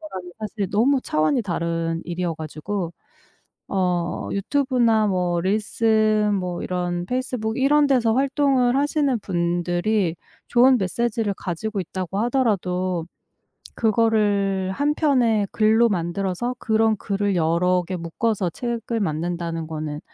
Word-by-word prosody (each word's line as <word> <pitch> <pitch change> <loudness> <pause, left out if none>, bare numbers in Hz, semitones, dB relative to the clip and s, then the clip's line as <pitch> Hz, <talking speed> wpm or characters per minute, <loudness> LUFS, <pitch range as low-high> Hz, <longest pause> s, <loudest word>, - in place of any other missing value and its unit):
거랑은 185 - -8
사실 210 -3 -4
너무 260 +6 +3
차원이 155 - +1
다른 165 -2 -2
일이어가지고 170 +1 -4 0.8
어 180 -3 -1
유튜브나 235 0 +2
뭐 180 -3 0
릴스 215 +2 +2
뭐 180 -2 -4
이런 175 -1 -2
페이스북 250 -3 -2
이런 290 +2 +4
데서 240 -5 +3
활동을 270 -2 +2
하시는 285 -3 +1
분들이 175 +1 0 0.3
좋은 250 +2 +5
메시지를 215 +2 -1
가지고 195 +4 -3
있다고 185 +2 -4
하더라도 185 -8 0 0.7
그거를 205 -4 +1
1 290 +7 0
편의 240 -9 +2
글로 220 +2 +4
만들어서 190 +5 -2
그런 220 0 +2
글을 200 -1 -1
여러 175 +2 +2
개 185 - -4
묶어서 185 +3 -1
책을 235 +3 -3
만든다는 170 -1 -2
거는 155 -1 -5
200 Hz, 270 characters per minute, -23 LUFS, 175-235 Hz, 0.8 s, 좋은